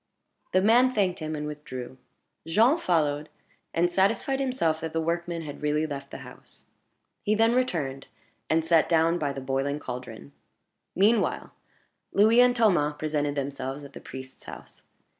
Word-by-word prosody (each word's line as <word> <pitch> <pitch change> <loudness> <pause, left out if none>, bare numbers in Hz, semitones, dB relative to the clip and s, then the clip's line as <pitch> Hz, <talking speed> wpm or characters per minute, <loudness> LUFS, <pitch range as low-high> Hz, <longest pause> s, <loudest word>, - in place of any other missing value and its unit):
The 185 - +3
man 245 +4 +4
thanked 190 -4 +1
him, 155 -1 -4
and 150 0 -4
withdrew. 130 -4 -7 0.5
Jean 230 - +4
followed, 150 - 0 0.4
and 175 +1 +1
satisfied 205 +9 +1
himself 250 -13 0
that 160 0 -5
the 165 - 0
workman 170 +1 -2
had 145 -2 -8
really 150 +1 +1
left 140 -2 -6
the - - -8
house. - - -15 0.6
He 215 - +1
then 225 +2 +3
returned, 155 - -1 0.4
and 160 0 +2
sat 165 -1 +3
down 165 +1 +3
by 145 -3 -1
the 135 -1 -6
boiling 135 +2 -1
caldron. 125 - -8 0.6
Meanwhile 215 +4 +2 0.6
Louis 220 +4 +5
and 250 0 +4
Thomas 175 -11 +2
presented 150 -2 -1
themselves 140 0 -4
at 140 - -13
the - - -10
priest's 130 0 -10
house. - - -11
160 Hz, 155 wpm, -27 LUFS, 145-195 Hz, 0.6 s, Louis